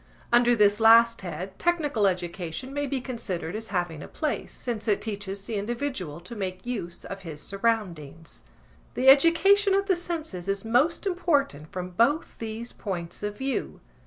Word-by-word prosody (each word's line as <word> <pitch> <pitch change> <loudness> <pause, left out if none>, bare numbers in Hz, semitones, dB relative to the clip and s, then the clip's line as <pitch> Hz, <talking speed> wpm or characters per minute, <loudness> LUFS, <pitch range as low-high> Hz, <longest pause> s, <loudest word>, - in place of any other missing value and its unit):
Under 240 0 +5
this 210 -1 +4
last 230 +1 +6
head 185 +2 -6
technical 295 -12 +2
education 180 +6 -3
may 285 0 -1
be 270 0 -1
considered 210 -8 -4
as 220 +1 -5
having 175 -6 -2
a - - -8
place, 305 -2 -3
since 235 -3 -4
it 210 - +3
teaches 200 -2 -5
the 225 -1 -3
individual 210 - -3
to 185 +7 -9
make 185 -2 -4
use 195 -9 -5
of 195 0 -7
his 160 -5 -8
surroundings. 180 -7 -3 0.5
The 260 +1 +5
education 385 +8 +6
of 395 0 +2
the 385 -2 +2
senses 320 - -5
is 195 +1 -2
most 265 - +2
important 290 - 0
from 180 -2 -5
both 240 - +1
these 225 +1 -5
points 175 -4 -5
of 205 0 -4
view. 265 0 -3
220 Hz, 160 wpm, -26 LUFS, 185-270 Hz, 0.5 s, last